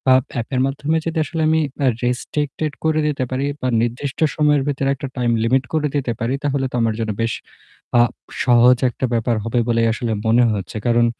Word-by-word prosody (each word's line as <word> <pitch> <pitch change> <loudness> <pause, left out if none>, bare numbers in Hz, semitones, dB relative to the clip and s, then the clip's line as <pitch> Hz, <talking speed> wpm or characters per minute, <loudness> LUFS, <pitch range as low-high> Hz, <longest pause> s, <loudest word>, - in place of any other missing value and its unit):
Up 130 - +3 0.2
app 115 - -5
এর 125 - +2
মাধ্যমে 145 +4 -1
যদি 165 0 -2
আসলে 165 0 -3
আমি 160 0 +3 0.2
অ্যা 135 -3 +3
restricted 145 +4 -2
করে 155 -1 +2
দিতে 140 -3 -1
পারি 135 +2 -1 0.2
বা 130 - 0
নির্দিষ্ট 125 +4 -3 0.2
সময়ের 150 -2 +3
ভিতরে 135 -1 0
একটা 135 - -6
time 120 -1 +1
limit 130 +3 +2
করে 150 -1 +1
দিতে 135 -4 0
পারি 115 +3 -1
তাহলে 140 -2 0
তো - - -5
আমার 115 -1 +1
জন্য 110 -1 -1
বেশ 115 0 0 0.7
আ - - +7 0.4
সহজ 125 0 +5
একটা 125 - -3
ব্যাপার 115 0 +1
হবে 115 +1 0
বলেই 115 -1 +2
আসলে 115 -1 -3 0.2
মনে 120 +2 +5
হচ্ছে। 95 +1 -5
কারণ 120 0 +4
130 Hz, 200 wpm, -20 LUFS, 120-145 Hz, 0.7 s, আ